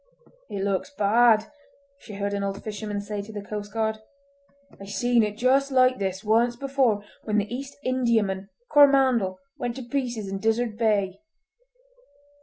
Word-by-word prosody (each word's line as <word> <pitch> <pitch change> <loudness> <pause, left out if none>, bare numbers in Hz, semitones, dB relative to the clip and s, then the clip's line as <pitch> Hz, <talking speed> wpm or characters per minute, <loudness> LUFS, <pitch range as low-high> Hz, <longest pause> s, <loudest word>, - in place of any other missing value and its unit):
"It 195 -1 -3
looks 195 +5 -1
bad," 220 +1 +4 0.5
she 215 - -11
heard 200 0 -2
an 200 0 -2
old 195 0 -4
fisherman 210 -1 -4
say 205 0 -4
to 205 +2 -10
the 205 -2 -6
coastguard. 215 +1 -3 0.8
"I 195 - -9
seen 240 +4 +2
it 210 -1 -2
just 270 +3 +3
like 255 -1 +4
this 190 0 -3
once 230 +3 +2
before, 260 -5 +1 0.2
when 215 -1 0
the 210 +3 -1
East 275 +2 -7
Indiaman 220 -7 0 0.2
Coromandel 265 -9 +4 0.2
went 240 -1 -3
to 260 - -6
pieces 240 -4 -3
in 195 0 -4
Dizzard 225 +1 0
Bay!" 205 -4 +1
220 Hz, 150 wpm, -25 LUFS, 200-245 Hz, 0.8 s, bad